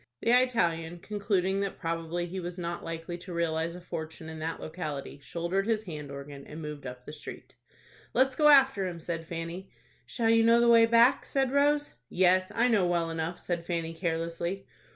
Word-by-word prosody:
The 230 - +2
Italian, 175 -10 +2
concluding 195 0 0 0.2
probably 165 +1 -2
that 170 - -10
he 190 - -3
was 175 0 -5
not 170 -1 -4
likely 165 +1 -5
to 180 0 -8
realize 165 0 -1
a 180 - -9
fortune 160 -2 -6
in 160 0 -7
that 160 +1 -3
locality, 150 -4 -5
shouldered 170 +7 -2
his 220 -2 +1
hand 150 -7 -7
organ, 140 0 -8
and 155 - -8
moved 150 -3 -6
up 125 0 -9
the 150 - -8
street. 150 - -8 0.6
"Let's 265 0 +4
go 300 +1 +4
after 270 -9 +6
him," 175 -2 -6
said 165 -1 -4
Fanny. 170 +3 -6 0.4
"Shall 225 - +1
you 230 0 +5
know 230 +1 +6
the 235 - +4
way 230 -1 +7
back?" 235 +2 +5
said 270 -2 +1
Rose. 290 +1 +2 0.2
"Yes, 185 0 +3
I 235 +2 +4
know 210 -7 +3
well 170 -1 0
enough," 165 +1 -3
said 175 -2 -3
Fanny, 165 -2 -2
carelessly. 170 +2 -3
175 Hz, 190 wpm, -29 LUFS, 165-210 Hz, 0.6 s, way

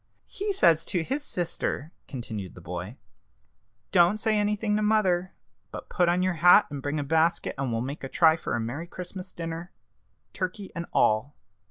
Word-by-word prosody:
"He 410 +1 -3
says 165 - +4
to 175 -3 -1
his 275 - -2
sister," 170 - -2 0.2
continued 110 -7 -6
the - - -10
boy, 90 +7 -6 0.9
"'Don't 175 +2 +5
say 215 0 +1
anything 210 0 +1
to 215 - +1
mother, 190 -4 +2 0.3
but - - -9
put 175 -2 +2
on 180 +1 +2
your 185 0 +1
hat, 180 +1 +8
and 140 -2 -5
bring 145 +2 -2
a - - -1
basket, 160 +3 +1
and 135 -2 -2
we'll 115 0 -1
make 135 +4 -5
a 135 - -4
try 160 +1 +5
for 165 - -3
a - - -1
merry 125 +9 -4
Christmas 180 +1 -7
dinner 165 +1 -6 0.6
turkey 190 +1 -4
and 170 -1 -4
all.' 110 +7 +2
170 Hz, 180 wpm, -27 LUFS, 140-185 Hz, 0.9 s, hat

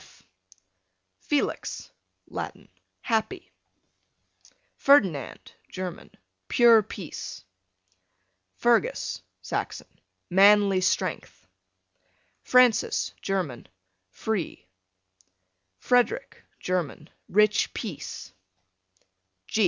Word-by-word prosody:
F - - -20 1.0
Felix, 295 -1 -2 0.4
Latin, - - -7 0.3
happy. 350 - -2 1.2
Ferdinand, 190 - +2 0.2
German, 185 -2 -6 0.4
pure 235 -2 +6
peace. 165 - -8 1.1
Fergus, 240 - +1 0.2
Saxon, - - -4 0.4
manly 195 0 +5
strength. 185 - -2 1.0
Francis, 250 -3 +3
German, 175 - -3 0.4
free. 185 - -4 1.1
Frederic, 330 - 0
German, 170 -4 -3 0.2
rich 210 +1 +3
peace. 190 - -7
205 Hz, 60 wpm, -26 LUFS, 180-240 Hz, 1.2 s, pure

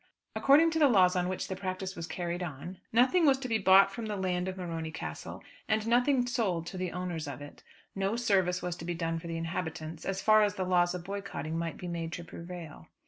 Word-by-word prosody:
According 305 +4 +5
to 320 - 0
the 295 - +7
laws 185 -7 +5
on 180 0 0
which 185 - -3
the 190 - -4
practice 190 0 -4
was 165 -1 -5
carried 175 0 -3
on 175 +2 -6
nothing 255 +10 +4
was 270 -1 +5
to 265 -1 -5
be 225 -2 +1
bought 195 +1 +6
from 220 +2 -5
the 210 - -2
land 185 -2 -1
of 190 0 -4
Morony 165 -3 -4
Castle, 75 - -7 0.2
and 215 0 +1
nothing 245 +2 +3
sold 195 -9 -1
to 180 - -7
the 185 -1 -2
owners 175 -4 -4
of 140 -2 -6
it. 145 0 -11 0.3
No 195 +2 -1
service 190 -6 +1
was 180 -1 -2
to 165 - -8
be 175 0 -2
done 165 -1 -2
for 170 - -9
the 165 0 -3
inhabitants, 165 -1 -4
as 195 0 -2
far 215 +2 +5
as 205 -1 +2
the 185 - -2
laws 175 -1 +2
of 180 - -6
boycotting 185 -5 -5
might 165 -1 -3
be 180 - -7
made 165 -1 -4
to 175 - -5
prevail. 170 - -9
180 Hz, 235 wpm, -30 LUFS, 170-200 Hz, 0.3 s, the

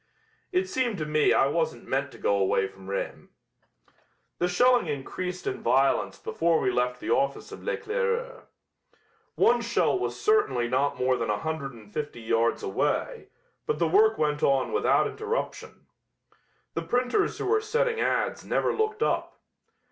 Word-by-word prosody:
It 370 0 +1
seemed 255 - -1
to 155 - -3
me 150 0 +2
I - - +4
wasn't 160 +3 -1
meant 140 +1 -1
to - - -13
go 100 - +1
away 95 0 +2
from 95 0 -13
Rheims." 100 - -4 1.1
The 175 - +2
shelling 245 +4 +3
increased 180 +6 -4
in - - -3
violence 135 +3 +2
before 165 -1 +1
we 130 - +1
left 125 0 0
the - - -3
office 140 0 0
of - - -9
L'Eclaireur. 485 +1 -2 0.9
One 240 0 +4
shell 235 +10 +1
was - - -3
certainly 420 - +2
not 130 +3 0
more 130 0 +2
than 115 -2 -2
a 105 - +1
hundred 155 -2 -4
and 105 -3 -15
fifty 145 -5 -4
yards 115 +1 +1
away, 460 +3 -1 0.4
but 450 - 0
the - - +2
work 430 +2 +4
went 150 -1 0
on 135 -1 +2
without 440 - +3
interruption. 440 +3 -4 0.9
The - - -2
printers 250 +12 0
who - - -4
were 435 +2 +2
setting 465 +1 0
ads - - 0
never - - 0
looked 435 0 0
up. - - -1
165 Hz, 160 wpm, -27 LUFS, -, 1.1 s, I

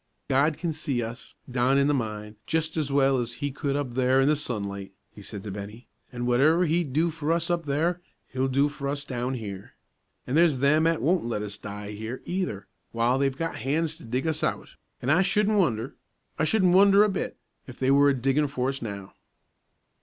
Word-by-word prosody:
"God 145 +3 +3
can 170 0 -2
see 135 -5 -1
us, 115 +2 -8
down 125 +2 +2
in 140 - +4
the 145 - +2
mine, 105 -4 -3
just 160 -1 -1
as 150 -3 -1
well 135 -1 +3
as 120 -1 -2
He 145 +4 -3
could 140 0 -2
up 140 -4 -2
there 130 +1 +3
in 135 - +4
the 150 - +4
sunlight," 100 -9 -4 0.2
he 105 - -12
said 100 0 -7
to 105 - -6
Bennie, 105 +4 -8 0.2
"an' 120 -1 -4
whatever 150 +9 +4
He'd 165 -2 0
do 160 +5 +1
for 155 0 -2
us 170 +1 0
up 170 -3 -1
there 165 +5 0 0.3
He'll 130 +1 -1
do 140 +2 +2
for 145 -1 -5
us 140 +1 -3
down 125 0 -3
here. 100 -5 -7 0.5
An' 125 - -4
there's 160 -3 +4
them 150 +4 +3
'at 165 -1 0
won't 175 -2 +2
let 105 -3 -2
us 105 0 -6
die 105 0 -7
here, 110 +4 -6
either, 175 - -3 0.3
w'ile 120 +3 +2
they've 135 -1 0
got 165 +1 -3
hands 155 +6 -1
to - - -14
dig 125 +6 -2
us 160 -1 -1
out; - - -1 0.3
an' 130 - +1
I 175 +5 +5
shouldn't 210 +2 +2
wonder 120 - 0 0.5
I - - +3
shouldn't 185 -1 +3
wonder 200 +2 +7
a - - +4
bit 190 - -3 0.3
if 130 - -10
they 130 0 +2
were 140 +1 +6
a 140 - +2
diggin' 135 +4 +1
for 130 -2 -1
us 135 0 -4
now." 100 -4 -6
135 Hz, 215 wpm, -26 LUFS, 120-160 Hz, 0.5 s, wonder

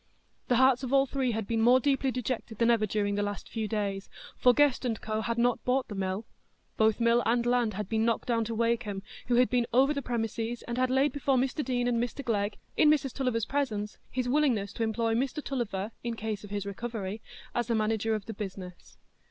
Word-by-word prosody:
The 245 - +3
hearts 260 0 +5
of 260 -2 -4
all 275 0 +5
three 265 -1 -1
had 220 -1 -2
been 225 +1 0
more 245 +3 +6
deeply 270 0 +1
dejected 250 -3 -3
than 235 +1 +4
ever 220 -2 +2
during 205 0 0
the 205 - 0
last 205 0 -4
few 220 -2 -3
days. 200 -2 -2 0.3
For 250 - +5
Guest 285 0 +3 0.2
&Co. 215 0 -2
had 230 +1 -2
not 240 0 +2
bought 255 +1 0
the - - -5
mill; 195 +2 -2 0.5
both 220 0 +3
mill 235 +1 +4
and 235 +1 +1
land 240 -4 +1
had 210 -1 -3
been 220 +1 0
knocked 230 0 0
down 230 -2 +2
to 225 +1 -3
Wakem, 230 -3 0 0.2
who 245 - +2
had 250 +1 +5
been 245 -2 +1
over 270 +4 +4
the 280 - -2
premises, 230 -1 -3
and 240 +1 -4
had 255 0 +2
laid 265 +2 +3
before 275 -1 +1
Mr 265 +4 0
Deane 245 -2 0
and 235 -1 +1
Mr 245 +3 -5
Glegg, 205 -2 0 0.2
in 305 - +5
Mrs 280 -4 +2
Tulliver's 250 -5 0
presence, 220 -7 -2
his 255 -1 -2
willingness 245 -8 +1
to - - -6
employ 225 +1 0
Mr 270 +5 -1
Tulliver, 220 -6 -3
in 235 -1 -2
case 215 -2 -4
of 205 - -9
his 205 -1 -3
recovery, 210 0 -5 0.3
as 240 -1 -1
a 230 - +2
manager 220 0 +1
of 210 -2 -5
the 225 - -6
business. 190 -3 -8
235 Hz, 220 wpm, -29 LUFS, 215-255 Hz, 0.5 s, more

